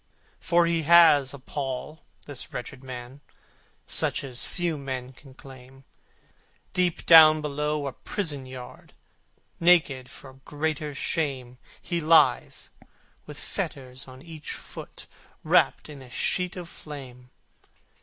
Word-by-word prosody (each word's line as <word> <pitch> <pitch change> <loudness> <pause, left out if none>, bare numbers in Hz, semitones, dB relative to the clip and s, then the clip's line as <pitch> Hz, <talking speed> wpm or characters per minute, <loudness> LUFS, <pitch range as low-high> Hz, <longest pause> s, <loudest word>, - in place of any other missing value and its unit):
For 170 0 +3
he 170 -1 +1
has 155 -4 +6
a 140 - -7
pall, 135 +2 -5 0.2
this 145 -4 -6
wretched 125 +1 -7
man, 130 +1 -9 0.6
Such - - +2
as 130 -3 -2
few 175 -2 -2
men 130 -3 -5
can 135 0 -17
claim: 135 0 -14 0.9
Deep 180 -2 0
down 155 -2 +9
below 150 0 -2
a 135 - -4
prison 145 -8 -3
yard, 130 -1 -11 0.7
Naked, 155 -7 +3
for 135 -1 -12
greater 150 -1 -3
shame, 130 -6 -3 0.2
He 170 -1 -3
lies, 160 +1 +3 0.6
with - - -9
fetters 130 0 -5
on 130 +1 -13
each 160 -3 -8
foot, - - -10 0.4
Wrapt - - +3
in 145 -3 -11
a 130 - -13
sheet 180 +8 -1
of 180 -2 -7
flame! 130 -6 -10
145 Hz, 125 wpm, -26 LUFS, 130-160 Hz, 0.9 s, down